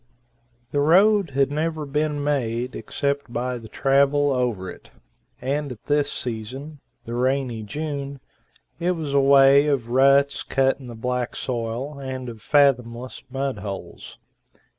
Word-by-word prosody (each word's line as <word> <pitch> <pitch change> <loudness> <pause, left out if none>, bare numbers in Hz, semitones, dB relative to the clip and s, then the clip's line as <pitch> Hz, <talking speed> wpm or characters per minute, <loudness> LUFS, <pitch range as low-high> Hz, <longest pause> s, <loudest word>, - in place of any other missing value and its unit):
The 145 - 0
road 190 +5 +4
had 140 0 +2
never 155 +1 -2
been 150 +1 -1
made 125 -4 -1
except 140 +3 -2
by 125 0 -2
the 115 - -11
travel 140 +3 +2
over 120 -8 -1
it, 85 - -10 0.5
and 140 +2 -2
at 110 - -17
this 145 -1 +1
season 125 +6 -6 0.3
the 115 - -6
rainy 125 -2 0
June 140 +3 -5 0.6
it 180 +1 +1
was 155 -5 -4
a 140 - +5
way 140 +1 +6
of 135 -6 0
ruts 140 +2 +4
cut 135 0 +1
in 130 - -10
the 120 - -8
black 125 +1 -2
soil, 125 +4 -4
and 130 -2 -5
of 115 -2 -10
fathomless 125 -4 +1
mud 135 -3 -3
holes. 100 -1 -8
135 Hz, 140 wpm, -23 LUFS, 125-145 Hz, 0.6 s, way